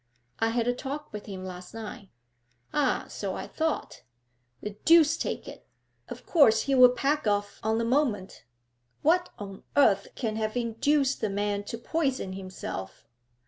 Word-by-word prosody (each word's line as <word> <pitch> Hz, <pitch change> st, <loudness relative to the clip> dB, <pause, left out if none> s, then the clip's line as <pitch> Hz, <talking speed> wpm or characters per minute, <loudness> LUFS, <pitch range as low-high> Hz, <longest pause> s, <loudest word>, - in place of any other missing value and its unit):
'I 225 Hz, -, +2 dB
had 235 Hz, 0 st, 0 dB
a 245 Hz, -, +3 dB
talk 280 Hz, +3 st, -6 dB
with 210 Hz, -1 st, -7 dB
him 190 Hz, -2 st, -6 dB
last 180 Hz, +3 st, -8 dB
night.' 210 Hz, -3 st, -8 dB, 0.6 s
'Ah, 285 Hz, -4 st, +1 dB
so -, -, -4 dB
I -, -, -5 dB
thought. 320 Hz, -1 st, -2 dB, 0.6 s
The 210 Hz, -, -4 dB
deuce 325 Hz, -1 st, +6 dB
take -, -, -4 dB
it! -, -, -11 dB, 0.4 s
Of -, -, -8 dB
course 225 Hz, -10 st, +5 dB
he'll 255 Hz, -2 st, +7 dB
pack 275 Hz, +1 st, 0 dB
off 205 Hz, 0 st, 0 dB
on 220 Hz, +1 st, +1 dB
the 230 Hz, -, 0 dB
moment. 230 Hz, -7 st, 0 dB, 0.6 s
What 355 Hz, +4 st, +3 dB
on 195 Hz, -2 st, -8 dB, 0.2 s
earth 200 Hz, -8 st, +5 dB
can 220 Hz, -4 st, -2 dB
have 215 Hz, +1 st, -2 dB
induced 265 Hz, +4 st, +1 dB
the 215 Hz, -, 0 dB
man 205 Hz, 0 st, -1 dB
to 230 Hz, -, -5 dB
poison 270 Hz, -, -1 dB
himself?' 185 Hz, -, -7 dB
225 Hz, 155 wpm, -28 LUFS, 205-280 Hz, 0.6 s, he'll